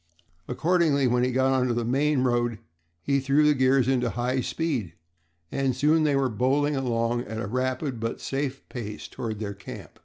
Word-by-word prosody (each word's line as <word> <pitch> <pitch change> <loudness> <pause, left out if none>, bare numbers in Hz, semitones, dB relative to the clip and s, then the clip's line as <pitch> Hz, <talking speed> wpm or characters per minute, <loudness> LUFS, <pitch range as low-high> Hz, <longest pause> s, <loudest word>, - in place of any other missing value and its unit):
Accordingly, 160 -5 +2
when 125 0 +2
he 125 - +1
got 130 +1 +2
on 130 -1 +2
to 120 - 0
the 120 -1 -1
main 135 +2 +2
road, 120 -2 +1 0.5
he 140 0 +2
threw 140 +3 +3
the 150 - +5
gears 130 -1 +3
into 125 -2 +1
high 125 +4 -1
speed, 125 - -2 0.6
and 135 -2 0
soon 155 +4 +3
they 145 -2 +2
were 135 -1 +2
bowling 135 +6 +1
along 120 -2 0
at 110 +1 -6
a 110 - -3
rapid, 130 +3 -2
but 115 +1 -3
safe, 135 0 -3
pace 105 -4 -6
toward 115 -4 -5
their 100 -1 -4
camp. 100 - -11
130 Hz, 185 wpm, -26 LUFS, 120-140 Hz, 0.6 s, the